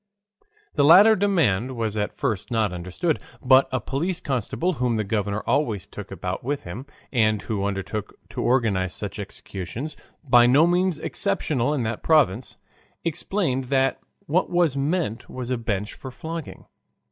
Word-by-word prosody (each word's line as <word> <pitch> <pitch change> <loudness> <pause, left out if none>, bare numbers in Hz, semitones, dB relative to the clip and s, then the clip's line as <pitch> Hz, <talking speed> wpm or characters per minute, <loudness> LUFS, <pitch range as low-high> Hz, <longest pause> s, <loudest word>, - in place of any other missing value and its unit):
The 145 - +2
latter 200 +9 +8
demand 130 - +1
was 110 -2 -2
at 105 -1 -2
first 110 -9 -2
not 110 -5 +1
understood. 95 - -2 0.2
But 130 +1 +5
a 130 - 0
police 165 +9 -2
constable 155 - -1
whom 125 -2 +2
the 110 - 0
governor 105 0 -1
always 115 -10 0
took 105 -1 -9
about 90 -1 -4
with 140 +3 -2
him, 115 +11 -7 0.2
and 110 -4 +2
who 105 -4 -2
undertook 100 +1 -3
to - - -4
organize 105 -8 +1
such 105 0 -6
executions 100 - -6 0.3
by 120 -4 +6
no 140 +6 +6
means 180 -1 +2
exceptional 155 - -1
in 145 -5 0
that 110 0 -3
province 130 - +2 0.5
explained 160 -5 -1
that 135 +1 +1 0.3
what 175 +6 +1
was 175 -5 +2
meant 140 - -1
was 125 -1 -5
a 125 - +1
bench 105 -2 -2
for 130 - -9
flogging. 160 +4 -7
125 Hz, 155 wpm, -24 LUFS, 105-155 Hz, 0.5 s, latter